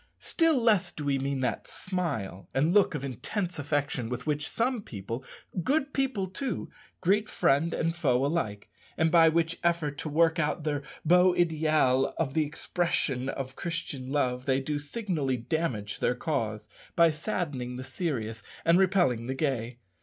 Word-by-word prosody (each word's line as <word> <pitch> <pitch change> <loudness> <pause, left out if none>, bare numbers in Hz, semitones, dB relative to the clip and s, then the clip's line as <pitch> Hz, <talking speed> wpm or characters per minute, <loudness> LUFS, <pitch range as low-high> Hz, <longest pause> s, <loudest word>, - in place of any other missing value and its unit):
Still 330 -5 +2
less 220 -6 +3
do 150 - -6
we 140 -1 +1
mean 135 0 -1
that 125 - -2
smile 145 - -3
and 150 +6 +3
look 200 -5 +4
of 140 -2 -3
intense 170 - -3
affection 145 -5 -1
with 125 0 -4
which 150 0 -1
some 240 0 0
people 115 - -6 0.4
good 280 - +1
people 265 -8 0
too 245 +8 -4 0.3
greet 205 +4 +2
friend 145 +5 +2
and 165 +1 -1
foe 135 -5 +2
alike, 125 -10 -2 0.3
and 160 0 +3
by 165 -2 +7
which 165 +1 0
effort 165 -4 0
to 155 - -3
work 165 +2 +3
out 150 0 0
their 145 -2 -1 0.2
beau 180 +2 +5
ideal 155 -6 +2
of 140 -5 -1
the 155 - +3
expression 145 -5 -1
of 135 -1 -5
Christian 155 -6 -4
love 125 -3 0
they 135 0 +3
do 145 +2 -2
signally 145 - -2
damage 120 -6 -2
their 125 - +1
cause, 110 -7 -2 0.3
by 170 -1 +6
saddening 150 - -3
the 130 - -5
serious 130 - -3 0.2
and 170 +2 +5
repelling 175 - +2
the 130 - -2
gay. 125 -4 -1
150 Hz, 160 wpm, -28 LUFS, 130-175 Hz, 0.4 s, by